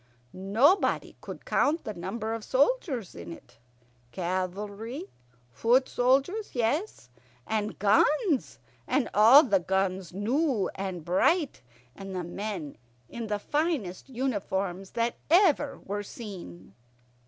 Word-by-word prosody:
Nobody 220 - +2
could - - -9
count 315 +4 +1
the 215 - -5
number 205 +5 -4
of 225 -1 -5
soldiers 270 - +1
in 85 0 -9
it 85 - -13 0.5
cavalry, 200 - -4 0.4
foot 245 - +3
soldiers, 275 - +1
yes, 240 - -1 0.3
and 215 -1 -2
guns, 275 - +2 0.3
and 265 +1 0
all 230 +8 +8
the 200 -7 +2
guns 190 -1 -1
new 235 - 0
and 190 -4 -5
bright, 290 - +2 0.3
and 195 -1 -7
the 180 - -2
men 175 - -5 0.3
in 235 -1 -6
the 210 -1 -1
finest 280 - -2
uniforms 200 -7 -2
that 235 0 0
ever 315 -5 +4
were 205 +1 -4
seen. 180 - -9
215 Hz, 115 wpm, -28 LUFS, 190-270 Hz, 0.5 s, all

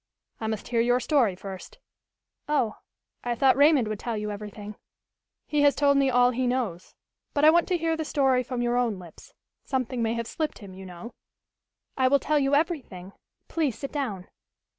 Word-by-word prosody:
"I 220 - -3
must 220 -1 -4
hear 235 -1 +2
your 245 +1 +3
story 240 -6 +2
first." 190 0 -9 0.7
"Oh, 250 -8 +1 0.5
I 240 -1 -1
thought 265 +2 +4
Raymond 285 -4 +5
would 215 -1 -4
tell 235 -2 -3
you 210 0 -3
everything." 210 0 -8 0.7
"He 295 -1 0
has 285 -1 +5
told 285 -1 +3
me 275 -1 +3
all 245 0 +4
he 255 +1 -1
knows. 235 -9 -3 0.4
But 290 +1 +3
I 310 - +9
want 345 +1 +3
to 365 -2 +1
hear 325 -1 0
the 320 - -3
story 270 -4 +2
from 250 -1 -3
your 240 0 +1
own 235 -5 0
lips. 175 -3 -14 0.3
Something 255 -2 -2
may 225 0 0
have 230 0 -3
slipped 310 +6 -3
him, 200 -4 -11
you 190 0 -10
know." 180 +7 -9 0.8
"I 260 -1 +3
will 280 +2 +5
tell 300 +2 +1
you 275 0 +2
everything. 270 - -2 0.3
Please 295 -9 -1
sit 275 - -6
down." 215 -11 -4
245 Hz, 190 wpm, -26 LUFS, 215-280 Hz, 0.8 s, I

